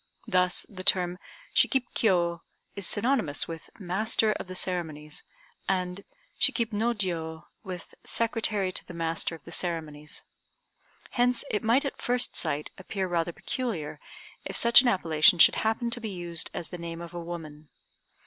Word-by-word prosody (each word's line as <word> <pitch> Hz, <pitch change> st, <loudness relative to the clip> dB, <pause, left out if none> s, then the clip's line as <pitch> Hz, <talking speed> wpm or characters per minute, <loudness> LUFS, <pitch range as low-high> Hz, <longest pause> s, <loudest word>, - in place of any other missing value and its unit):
Thus 180 Hz, -1 st, +2 dB
the 185 Hz, -3 st, -8 dB
term 180 Hz, -1 st, +3 dB, 0.3 s
"Shikib 265 Hz, -3 st, +3 dB
Kiô" 170 Hz, -5 st, +2 dB, 0.3 s
is 200 Hz, -3 st, -2 dB
synonymous 220 Hz, -, +1 dB
with 165 Hz, -1 st, -8 dB
"master 215 Hz, +3 st, +1 dB
of 210 Hz, -, -4 dB
the 185 Hz, -, -7 dB
ceremonies," 155 Hz, -5 st, -2 dB, 0.5 s
and 185 Hz, 0 st, -1 dB, 0.4 s
"Shikib 230 Hz, -2 st, +2 dB
no 230 Hz, +3 st, +1 dB
Jiô" 165 Hz, -5 st, -2 dB, 0.2 s
with 185 Hz, -4 st, -8 dB
"secretary 215 Hz, -4 st, +1 dB
to -, -, -2 dB
the 175 Hz, -, -10 dB
master 165 Hz, 0 st, 0 dB
of 160 Hz, -, -16 dB
the 170 Hz, -, -11 dB
ceremonies." 155 Hz, -4 st, -3 dB, 0.9 s
Hence 245 Hz, +2 st, +2 dB
it 210 Hz, -, 0 dB
might 240 Hz, +6 st, +3 dB
at 275 Hz, -, -4 dB
first 245 Hz, 0 st, +1 dB
sight 150 Hz, -2 st, -1 dB
appear 190 Hz, 0 st, -3 dB
rather 175 Hz, -1 st, 0 dB
peculiar 200 Hz, -, -4 dB, 0.4 s
if -, -, -4 dB
such 235 Hz, +1 st, +8 dB
an 255 Hz, -, 0 dB
appellation 170 Hz, -6 st, +5 dB
should -, -, +7 dB
happen 225 Hz, +2 st, 0 dB
to 240 Hz, -, -1 dB
be 220 Hz, -, -4 dB
used 175 Hz, -3 st, -3 dB
as 165 Hz, -, -6 dB
the 180 Hz, -, -7 dB
name 170 Hz, 0 st, -6 dB
of 170 Hz, 0 st, -8 dB
a 175 Hz, -, -5 dB
woman. 155 Hz, -3 st, -8 dB
180 Hz, 160 wpm, -28 LUFS, 165-220 Hz, 0.9 s, such